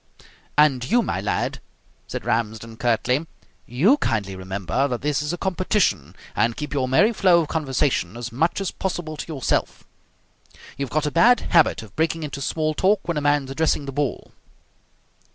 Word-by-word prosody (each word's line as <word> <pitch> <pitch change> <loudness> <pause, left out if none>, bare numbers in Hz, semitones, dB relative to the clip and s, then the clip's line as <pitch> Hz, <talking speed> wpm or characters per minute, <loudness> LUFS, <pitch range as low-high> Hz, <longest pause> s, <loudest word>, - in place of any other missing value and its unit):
"And 135 -5 +3
you, 240 +1 +3
my 95 - -2
lad," 105 - -2 0.5
said - - -6
Ramsden 110 0 -2
curtly, 125 +6 0 0.4
"you 175 - +3
kindly 105 - -1
remember 95 - -2
that 125 -2 -4
this 145 -2 0
is 150 +1 -2
a 175 - -3
competition, 185 - 0 0.2
and 115 0 +1
keep 150 0 -5
your 135 -3 0
merry 205 - +4
flow 180 -5 +4
of 155 - -5
conversation 135 - -1
as 120 0 -6
much 160 +11 0
as 195 -2 -2
possible 175 -4 -4
to - - -7
yourself. 135 -5 -1 0.9
You've 140 -1 -4
got 155 +4 0
a 150 - -1
bad 235 +9 +5
habit 165 -8 +3
of 110 - -15
breaking 160 0 0
into 140 -2 -5
small 155 +3 -1
talk 195 +5 +1
when 170 -3 -1
a - - 0
man's 145 -2 +1
addressing 150 0 0
the 135 - -5
ball." 145 -1 -3
145 Hz, 170 wpm, -23 LUFS, 120-165 Hz, 0.9 s, bad